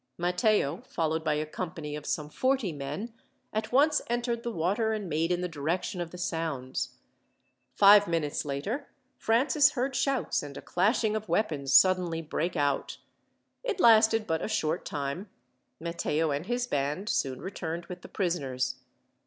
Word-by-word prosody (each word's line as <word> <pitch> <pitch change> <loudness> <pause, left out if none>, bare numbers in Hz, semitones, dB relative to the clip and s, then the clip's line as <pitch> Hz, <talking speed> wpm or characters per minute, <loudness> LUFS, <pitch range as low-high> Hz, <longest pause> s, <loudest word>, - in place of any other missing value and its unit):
Matteo, 180 - +1
followed 160 -1 -1
by 155 -1 +1
a 155 +1 -1
company 160 -2 -5
of 150 0 -7
some 150 -1 -1
forty 255 - 0
men, 150 +10 -5 0.4
at 215 0 -2
once 290 +4 +4
entered 240 0 -1
the 235 - -3
water, 205 +5 0
and 210 -3 -3
made 165 +2 0
in 175 0 +1
the 180 - -1
direction 170 +4 -2
of 170 - -4
the 180 - -10
sounds. 160 -8 -3 0.8
Five 205 0 +7
minutes 160 -3 -1
later, 150 - -3 0.3
Francis 280 +6 +3
heard 265 0 -1
shouts 270 +1 0
and 145 -1 -8
a - - -7
clashing 215 +4 +1
of 215 -3 -4
weapons 160 -7 0
suddenly 180 0 +5
break 165 +3 -2
out. 145 -3 0 0.7
It 460 -6 -2
lasted 225 -3 +6
but 160 -3 -1
a - - -1
short 160 -8 -1
time. 145 +7 -4 0.5
Matteo 165 -2 -1
and 145 +5 -3
his 245 +1 0
band 145 - -2
soon 130 - 0
returned 170 -3 -5
with 180 0 -8
the - - -11
prisoners. 135 -9 -1
175 Hz, 160 wpm, -29 LUFS, 150-220 Hz, 0.8 s, Five